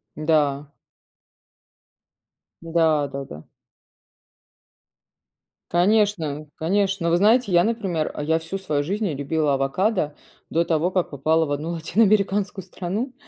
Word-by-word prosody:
Да. 150 -2 0 1.9
Да, 160 -3 +1
да-да. 135 - -8 2.3
Конечно, 175 -5 +1
конечно! 195 +2 0
Но - - +2
вы 170 - +4
знаете, 220 +3 +3
я, 175 -1 +5
например, 195 -8 -1
я 160 +2 +1
всю 165 +4 -5
свою 155 -7 -1
жизнь 200 +8 -2
не 175 - -1
любила 145 +1 0
авокадо 150 +4 0 0.3
до 170 +1 +1
того, 165 +1 +1
как 185 -1 -1
попала 155 +3 +1
в 145 - -5
1 145 +3 -2
латиноамериканскую 195 +2 +1
страну. 195 +8 -4
165 Hz, 115 wpm, -23 LUFS, 150-195 Hz, 2.3 s, я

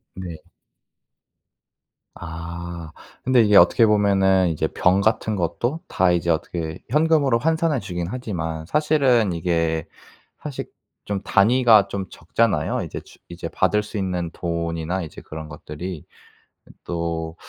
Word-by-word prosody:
네. 85 -4 -7 1.8
아 85 0 -7 0.3
근데 130 -1 +4
이게 105 -2 +4
어떻게 105 +6 +6
보면은 95 -3 +3
이제 80 - 0
병 90 +2 +2
같은 110 0 +1
것도 120 - -1
다 95 -1 +2
이제 85 -1 +1
어떻게 80 0 -2
현금으로 150 -5 +3
환산해 160 +2 +1
주긴 90 -4 -4
하지만 85 -9 -4
사실은 135 - +2
이게 80 -1 0 0.5
사실 145 -3 -6 0.4
좀 100 -1 -3
단위가 110 0 +5
좀 100 -1 -4
적잖아요. 110 +7 0
이제 - - -6
주 - - -18
이제 85 -1 -6
받을 105 +5 +1
수 105 +1 -8
있는 90 -4 -2
돈이나 85 +1 -3
이제 80 - -9
그런 80 0 -8
것들이. 75 +3 -7 0.8
또 85 -1 -3
90 Hz, 255 characters per minute, -22 LUFS, 85-110 Hz, 1.8 s, 어떻게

